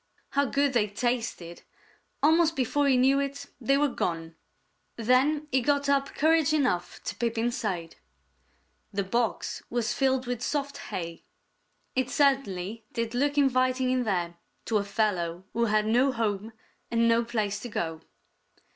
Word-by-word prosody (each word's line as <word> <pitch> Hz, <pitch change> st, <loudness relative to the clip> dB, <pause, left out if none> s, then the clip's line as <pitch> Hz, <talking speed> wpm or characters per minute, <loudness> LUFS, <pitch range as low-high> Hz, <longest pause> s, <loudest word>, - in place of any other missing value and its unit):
How 280 Hz, +1 st, +2 dB
good 280 Hz, +1 st, +1 dB
they 220 Hz, -4 st, +2 dB
tasted! 215 Hz, -6 st, -3 dB, 0.6 s
Almost 325 Hz, +2 st, +4 dB
before 280 Hz, +2 st, +1 dB
he 265 Hz, -2 st, +4 dB
knew 265 Hz, +2 st, +4 dB
it, 280 Hz, 0 st, -3 dB, 0.2 s
they 275 Hz, +4 st, +3 dB
were 295 Hz, +1 st, +3 dB
gone. 165 Hz, -10 st, -3 dB, 0.6 s
Then 265 Hz, +6 st, +2 dB
he 260 Hz, 0 st, +3 dB
got 285 Hz, +2 st, +1 dB
up 275 Hz, -1 st, +1 dB
courage 315 Hz, 0 st, +3 dB
enough 215 Hz, -13 st, 0 dB
to -, -, -4 dB
peep 230 Hz, -1 st, -2 dB
inside. 210 Hz, -8 st, -2 dB, 0.9 s
The 200 Hz, 0 st, -1 dB
box 230 Hz, +4 st, -1 dB
was 240 Hz, -1 st, -1 dB
filled 265 Hz, -1 st, +1 dB
with 245 Hz, -1 st, -3 dB
soft 280 Hz, +2 st, -2 dB
hay. 170 Hz, -2 st, -5 dB, 0.7 s
It 260 Hz, -1 st, +1 dB
certainly 225 Hz, -8 st, +1 dB
did 230 Hz, -1 st, -3 dB
look 285 Hz, +4 st, 0 dB
inviting 255 Hz, -2 st, +2 dB
in 255 Hz, -1 st, +1 dB
there 175 Hz, -5 st, -1 dB, 0.3 s
to 220 Hz, -2 st, +1 dB
a -, -, -1 dB
fellow 190 Hz, -5 st, -1 dB
who 235 Hz, 0 st, +2 dB
had 215 Hz, -1 st, +2 dB
no 245 Hz, +5 st, +3 dB
home 220 Hz, -2 st, -2 dB, 0.4 s
and 230 Hz, 0 st, +2 dB
no 230 Hz, 0 st, +4 dB
place 215 Hz, -3 st, -2 dB
to 245 Hz, -, -7 dB
go. 160 Hz, -6 st, -3 dB
240 Hz, 150 wpm, -28 LUFS, 210-275 Hz, 0.9 s, Almost